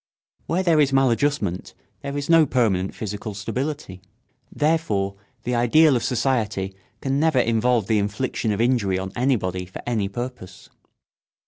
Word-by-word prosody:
Where 180 +3 0
there 165 -4 +3
is 140 -2 +2
maladjustment 135 -6 +1 0.3
there 140 0 -4
is 145 - -3
no 165 -2 +5
permanent 100 -8 +1
physical 105 0 -5
stability. 125 -1 -4 0.5
Therefore 145 -12 0 0.3
the 125 - -2
ideal 130 +5 +4
of 120 - 0
society 115 -6 -1 0.3
can 135 +1 0
never 160 -2 +2
involve 115 -1 +2
the 110 +1 +2
infliction 105 +2 -2
of 105 - -2
injury 115 -6 +2
on 95 0 -4
anybody 95 -8 0
for 90 - -9
any 110 -5 -1
purpose. 120 -5 -7
120 Hz, 140 wpm, -23 LUFS, 100-135 Hz, 0.5 s, no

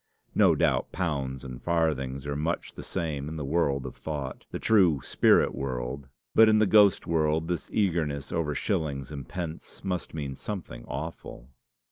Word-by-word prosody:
No - - +5
doubt - - +1
pounds 70 -7 -2
and 65 -2 -8
farthings 75 -6 0
are 70 0 -2
much 80 +4 -2
the - - -8
same 75 -3 -3
in 80 - -6
the 75 -3 -4
world 70 -3 +1
of 65 - -6
thought 70 -4 -5
the - - -4
true 95 -10 +4
spirit - - +4
world; 65 +1 -4 0.2
but 110 0 +7
in 110 - +5
the 110 - +5
ghost 105 -2 +5
world 80 -1 +1
this 90 -1 -3
eagerness 80 -8 0
over 80 -3 -1
shillings 75 - -2
and 70 -4 -7
pence 85 -3 -6
must 90 -4 -3
mean 70 -3 -3
something 65 - -6
awful! 70 -3 -7
75 Hz, 165 wpm, -28 LUFS, 70-85 Hz, 0.2 s, but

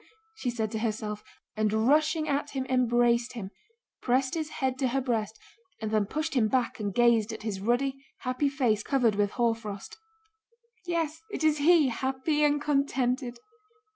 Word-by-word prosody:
she 360 - -3
said 220 -3 -2
to 220 - -2
herself, 215 -2 -3 0.3
and 215 -1 +1 0.2
rushing 310 +2 +3
at 290 +1 -1
him 265 -2 -3
embraced 240 -1 +2
him, 200 -5 -6 0.5
pressed 260 +1 +1
his 315 -2 -2
head 260 -3 -2
to 265 - +2
her 260 +2 0
breast, 225 -4 -2 0.4
and 220 -1 -3
then 215 -2 +1
pushed 310 +6 -2
him 240 -5 +3
back 250 0 0
and 205 -3 -3
gazed 235 -2 +4
at 220 -1 -7
his 210 -3 -3
ruddy, 265 +5 0 0.2
happy 255 +3 0
face, 245 -6 +1
covered 245 -3 +2
with 205 0 +1
hoarfrost. 225 -4 -2 0.9
"Yes, 325 -2 -1
it - - -4
is 310 -1 +3
he, 310 -2 +5
happy 265 +5 0
and 295 0 +3
contented...." 265 -4 0
250 Hz, 165 wpm, -28 LUFS, 220-285 Hz, 0.9 s, he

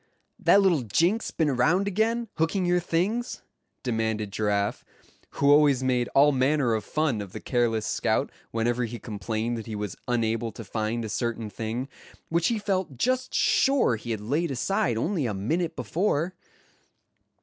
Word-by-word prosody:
"That 200 - +5
little 175 -7 +3
jinx 170 - +1
been 160 - 0
around 165 +10 +2
again, 225 +4 0
hooking 170 +4 +1
your 175 0 +3
things?" 195 +9 -1 0.4
demanded 110 -4 -1
Giraffe, 100 -1 -1 0.5
who 140 0 +3
always 145 -3 +5
made 125 -2 +1
all 145 +2 +6
manner 135 -2 +2
of 110 - -1
fun 150 -8 0
of 100 -2 -9
the - - -5
careless 115 -3 0
scout 110 - 0 0.2
whenever 120 +2 0
he 120 +1 -6
complained 110 +2 -3
that 110 - -9
he 110 - -4
was 105 -3 -4
unable 115 -1 0
to 115 - -8
find 110 +2 -2
a - - -3
certain 115 0 -3
thing, 115 +5 -4 0.4
which 170 0 +2
he 230 - +1
felt 190 - -2
just 255 - 0
sure 270 - +3
he 115 +2 -9
had 110 -3 -2
laid 150 +10 0
aside 130 - 0
only 155 - 0
a 105 - -3
minute 160 - -1
before. 175 -1 -1
125 Hz, 160 wpm, -26 LUFS, 110-170 Hz, 0.5 s, all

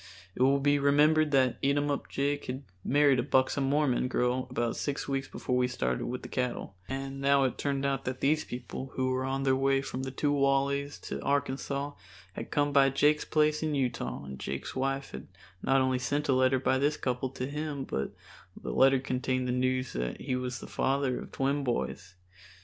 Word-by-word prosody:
It - - -5
will 135 +2 +5
be 145 +1 +3
remembered 150 +2 +4
that 130 -3 +2
Eatumup 145 +1 0
Jake 145 +1 -1
had 130 +2 -5 0.2
married 140 -1 +4
a - - +4
buxom 130 +1 +2
Mormon 135 -3 +2
girl 125 0 0
about 120 -2 -1
six 145 -1 -3
weeks 135 -1 -1
before 125 - -3
we 125 0 +3
started 65 - -2
with 125 +1 -4
the - - -6
cattle, 125 -6 -3
and 135 0 -4
now 140 0 +4
it 130 - -1
turned 140 -1 -1
out 135 -1 -1
that 130 0 -3
these 155 +3 +2
people, 125 +2 -7
who 130 0 0
were 130 0 -1
on 135 +1 -1
their 135 -1 +3
way 135 0 +2
from 135 -1 -4
the 130 - -3
Two 145 +2 0
Wallys 140 0 +1
to - - -5
Arkansas, 140 0 -1 0.4
had - - -6
come 145 0 +1
by 135 -1 +6
Jake's 150 +3 +2
place 155 0 +2
in 155 -2 0
Utah 125 - -2
and 65 -1 -8
Jake's 65 0 -5
wife 135 +1 -1
had 65 - -8 0.3
not 135 0 +3
only 130 -1 +1
sent 145 +3 -1
a - - +5
letter 130 0 +3
by 130 0 +1
this 145 +2 +1
couple 125 0 -2
to 125 0 -4
him, 145 0 -4
but 70 - -3 0.5
the 60 - -5
letter 135 - +5
contained 130 -1 -1
the - - 0
news 130 0 0
that - - -3
he 130 -1 -2
was 125 -1 -3
the - - -9
father 135 -1 0
of - - -9
twin 140 +1 0
boys. 100 -7 -3
135 Hz, 200 wpm, -30 LUFS, 130-140 Hz, 0.5 s, by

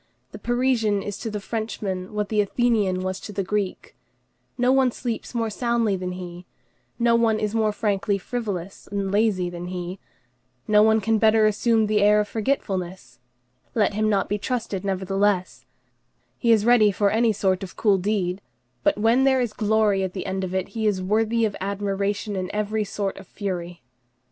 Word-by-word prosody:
The - - -9
Parisian 235 -4 +1
is 205 -1 -4
to 230 - -4
the 210 -1 -4
Frenchman 200 -4 -4
what 210 -1 -2
the 215 -1 +2
Athenian 205 -4 +1
was 185 0 -3
to - - -8
the 200 -1 -2
Greek: 200 0 -3 0.6
no 250 0 +3
one 265 -1 +4
sleeps 240 0 -5
more 225 -2 0
soundly 235 -2 +1
than 180 -1 -4
he, 180 -1 -8 0.5
no 235 -1 +3
one 230 -2 +3
is 210 0 -1
more 220 -1 +2
frankly 205 -1 0
frivolous 195 -4 -5
and 200 -1 -2
lazy 205 -3 +2
than 175 0 -6
he, 180 +1 -5 0.7
no 210 0 +5
one 220 0 +4
can 220 +2 +1
better 220 0 +5
assume 220 +1 +2
the 210 0 +1
air 210 +1 +5
of 210 - 0
forgetfulness; 190 - -3 0.6
let 210 -3 +2
him 215 +1 +1
not 200 -2 +1
be 205 - -1
trusted 220 -5 -3
nevertheless; 195 0 -1 0.7
he 235 - +3
is 220 -2 +4
ready 230 -3 +5
for 200 +1 +1
any 225 +1 +3
sort 190 -2 0
of 190 -2 -8
cool 200 -3 +3
deed; 190 -1 -1 0.4
but - - +2
when 230 +5 +3
there 265 -1 +4
is 240 -4 -1
glory 210 -2 +2
at 190 -1 -2
the 185 - -5
end 190 0 -2
of 185 0 -3
it, 190 0 -1
he 220 +1 -1
is 200 -3 +1
worthy 220 +4 +1
of 210 - -2
admiration 200 +1 -2
in 185 -1 -3
every 210 +1 0
sort 200 -1 -3
of 195 - -11
fury. 175 -5 -5
205 Hz, 185 wpm, -24 LUFS, 190-220 Hz, 0.7 s, no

